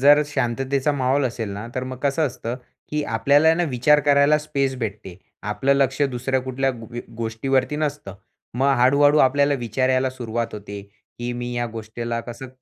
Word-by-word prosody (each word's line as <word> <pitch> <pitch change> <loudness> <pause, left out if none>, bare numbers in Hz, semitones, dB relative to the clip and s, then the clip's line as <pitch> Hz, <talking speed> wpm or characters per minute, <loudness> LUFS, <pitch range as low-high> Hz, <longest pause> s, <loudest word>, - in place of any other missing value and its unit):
जर 145 +2 +7
शांततेचा 135 +1 0
माहौल 135 0 +1
असेल 115 -3 -4
ना, 100 +3 -6
तर 130 - -2
मग 130 -1 -6
कसं 145 +2 +1
असतं, 125 -2 -5 0.3
की 150 0 -1
आपल्याला 145 +8 +4
ना 175 - 0
विचार 150 +1 +3
करायला 145 +1 +5
स्पेस 140 -3 -1
भेटते. 105 -6 -5 0.3
आपलं 130 +6 +1
लक्ष 135 0 +1
दुसऱ्या 130 -1 0
कुठल्या 130 +1 -1
ग 120 -1 -8 0.2
गोष्टीवरती 130 +5 -1
नसतं. 145 -10 -3 0.4
मग 135 +3 +2
हळू-हळू 145 +4 +5
आपल्याला 140 +2 +4
विचार 130 +3 0
यायला 130 0 +2
सुरुवात 120 -2 -3
होते, 100 -1 -7 0.4
की 120 0 -3
मी 120 0 -4
या 120 0 -1
गोष्टीला 115 +1 -5
कसं 120 +2 -8
130 Hz, 165 wpm, -22 LUFS, 120-140 Hz, 0.4 s, जर